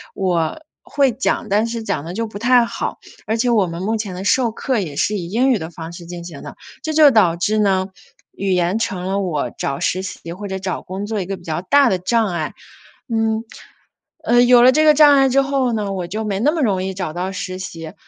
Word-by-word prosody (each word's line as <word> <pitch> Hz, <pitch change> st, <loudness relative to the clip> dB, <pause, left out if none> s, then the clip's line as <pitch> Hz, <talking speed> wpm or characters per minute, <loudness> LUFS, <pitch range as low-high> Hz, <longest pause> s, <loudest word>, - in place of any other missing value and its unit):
我 180 Hz, -, -1 dB, 0.2 s
会 275 Hz, -3 st, +1 dB
讲， 230 Hz, -2 st, -1 dB
但 210 Hz, +3 st, +2 dB
是 230 Hz, -1 st, -4 dB
讲 145 Hz, -, -2 dB
得 175 Hz, +3 st, -7 dB
就 230 Hz, -, -1 dB
不 210 Hz, -2 st, -8 dB
太 245 Hz, 0 st, +4 dB
好， -, -, -4 dB, 0.3 s
而 220 Hz, +1 st, 0 dB
且 240 Hz, +1 st, +1 dB
我 205 Hz, -6 st, +3 dB
们 170 Hz, +1 st, -6 dB
目 220 Hz, +3 st, 0 dB
前 205 Hz, -4 st, -4 dB
的 185 Hz, -, -6 dB
授 240 Hz, +3 st, +2 dB
课 255 Hz, 0 st, -1 dB
也 155 Hz, -7 st, -5 dB
是 210 Hz, +8 st, 0 dB
以 170 Hz, -2 st, -5 dB
英 255 Hz, +6 st, +2 dB
语 225 Hz, -, +2 dB
的 160 Hz, +1 st, -6 dB
方 165 Hz, 0 st, -9 dB
式 170 Hz, -1 st, -10 dB
进 175 Hz, -1 st, -7 dB
行 165 Hz, -5 st, -9 dB
的。 -, -, -9 dB, 0.3 s
这 315 Hz, -, -3 dB
就 300 Hz, -2 st, +7 dB
导 185 Hz, -7 st, +4 dB
致 210 Hz, +5 st, 0 dB
呢， 190 Hz, -2 st, +2 dB, 0.4 s
语 195 Hz, -1 st, -2 dB
言 180 Hz, +4 st, +1 dB
成 185 Hz, -4 st, -3 dB
了 195 Hz, +1 st, -1 dB
我 150 Hz, -10 st, -2 dB
找 140 Hz, 0 st, -3 dB
实 185 Hz, -, 0 dB
习 170 Hz, -3 st, -7 dB
或 200 Hz, +4 st, -7 dB
者 190 Hz, -1 st, -4 dB
找 185 Hz, -2 st, -4 dB
工 190 Hz, +2 st, -6 dB
作 215 Hz, -1 st, -3 dB
一 -, -, -4 dB
个 195 Hz, -, -4 dB
比 -, -, -16 dB
较 160 Hz, +1 st, -3 dB
大 275 Hz, +7 st, +4 dB
的 190 Hz, -, +1 dB
障 225 Hz, +4 st, +1 dB
碍。 170 Hz, -4 st, -3 dB, 0.6 s
嗯， 225 Hz, 0 st, 0 dB, 0.8 s
呃， 240 Hz, 0 st, +4 dB
有 245 Hz, 0 st, +6 dB
了 255 Hz, +1 st, +7 dB
这 310 Hz, +3 st, +3 dB
个 305 Hz, -, +7 dB
障 295 Hz, -1 st, +7 dB
碍 270 Hz, 0 st, +5 dB
之 275 Hz, +2 st, +3 dB
后 270 Hz, -3 st, 0 dB
呢， 210 Hz, -3 st, -2 dB
我 180 Hz, -2 st, -4 dB
就 215 Hz, +5 st, -4 dB
没 200 Hz, -2 st, -2 dB
那 295 Hz, +7 st, +3 dB
么 325 Hz, -, -2 dB
容 195 Hz, -7 st, +1 dB
易 190 Hz, 0 st, -3 dB
找 180 Hz, -4 st, -4 dB
到 185 Hz, +2 st, -3 dB
实 185 Hz, 0 st, -5 dB
习。 165 Hz, -4 st, -7 dB
200 Hz, 260 characters per minute, -19 LUFS, 180-235 Hz, 0.8 s, 就